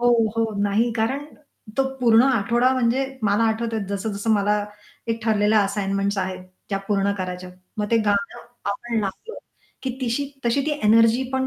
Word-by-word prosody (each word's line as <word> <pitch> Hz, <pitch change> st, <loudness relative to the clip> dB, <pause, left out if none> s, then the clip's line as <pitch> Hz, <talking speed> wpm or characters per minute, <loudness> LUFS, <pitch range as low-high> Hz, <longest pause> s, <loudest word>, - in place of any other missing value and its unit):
हो, 245 Hz, -, +3 dB, 0.3 s
हो, 225 Hz, -1 st, 0 dB
नाही, 215 Hz, +4 st, +2 dB
कारण 240 Hz, +6 st, -1 dB, 0.5 s
तो 270 Hz, -, +4 dB, 0.2 s
पूर्ण 230 Hz, -2 st, +5 dB
आठवडा 240 Hz, +3 st, +2 dB
म्हणजे 255 Hz, +1 st, +1 dB, 0.2 s
मला 205 Hz, +1 st, +2 dB
आठवतंय 225 Hz, 0 st, -1 dB
जसं-जसं 200 Hz, +2 st, -2 dB
मला 205 Hz, 0 st, +1 dB, 0.4 s
एक 230 Hz, 0 st, -2 dB
ठरलेल्या 215 Hz, -1 st, +3 dB
असाइनमेंट्स 200 Hz, 0 st, -1 dB
आहेत 185 Hz, -1 st, -3 dB, 0.2 s
त्या 195 Hz, -1 st, -1 dB
पूर्ण 200 Hz, -1 st, +2 dB
करायच्यात. 180 Hz, 0 st, -5 dB, 0.2 s
मग 210 Hz, -, -1 dB
ते 230 Hz, -, +4 dB
गाणं 200 Hz, +3 st, 0 dB, 0.3 s
आपण 230 Hz, +2 st, -3 dB
लावलं 210 Hz, -, -5 dB, 0.5 s
की 260 Hz, -, -1 dB
तिशी 255 Hz, +3 st, 0 dB, 0.2 s
तशी 235 Hz, +4 st, +2 dB
ती 310 Hz, -, +1 dB
एनर्जी 230 Hz, +3 st, +5 dB
पण 265 Hz, 0 st, 0 dB
220 Hz, 155 wpm, -23 LUFS, 200-235 Hz, 0.5 s, पूर्ण